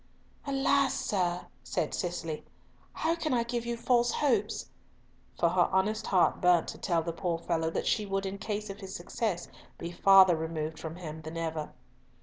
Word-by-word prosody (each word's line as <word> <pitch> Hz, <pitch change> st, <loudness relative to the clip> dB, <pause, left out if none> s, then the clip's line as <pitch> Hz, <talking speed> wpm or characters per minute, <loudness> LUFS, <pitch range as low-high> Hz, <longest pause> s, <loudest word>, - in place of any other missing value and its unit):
"Alas! 275 Hz, 0 st, +2 dB
sir," 180 Hz, -3 st, -1 dB, 0.2 s
said -, -, -2 dB
Cicely, 170 Hz, -3 st, -3 dB, 0.5 s
"how 325 Hz, +1 st, 0 dB
can 315 Hz, -5 st, -1 dB
I 235 Hz, -, +2 dB
give 235 Hz, 0 st, -3 dB
you 235 Hz, 0 st, -2 dB
false 240 Hz, 0 st, +2 dB
hopes?" 285 Hz, -5 st, 0 dB, 0.7 s
For 170 Hz, -, +3 dB
her 175 Hz, 0 st, +3 dB
honest 205 Hz, +3 st, +1 dB
heart 185 Hz, -3 st, +3 dB
burnt 180 Hz, -2 st, +4 dB
to -, -, -7 dB
tell 170 Hz, -3 st, +1 dB
the 170 Hz, 0 st, -3 dB
poor 170 Hz, 0 st, -1 dB
fellow 165 Hz, -1 st, -1 dB
that -, -, -2 dB
she 210 Hz, -2 st, +1 dB
would 195 Hz, 0 st, -1 dB
in 195 Hz, +1 st, -4 dB
case 210 Hz, -1 st, -3 dB
of 195 Hz, -, -10 dB
his 190 Hz, -2 st, -7 dB
success 180 Hz, 0 st, -2 dB, 0.3 s
be 170 Hz, -, -5 dB
farther 190 Hz, 0 st, +7 dB
removed 160 Hz, -1 st, -3 dB
from 160 Hz, 0 st, -6 dB
him 160 Hz, -3 st, -7 dB
than 160 Hz, +2 st, -7 dB
ever. 160 Hz, -2 st, -3 dB
185 Hz, 175 wpm, -30 LUFS, 165-220 Hz, 0.7 s, farther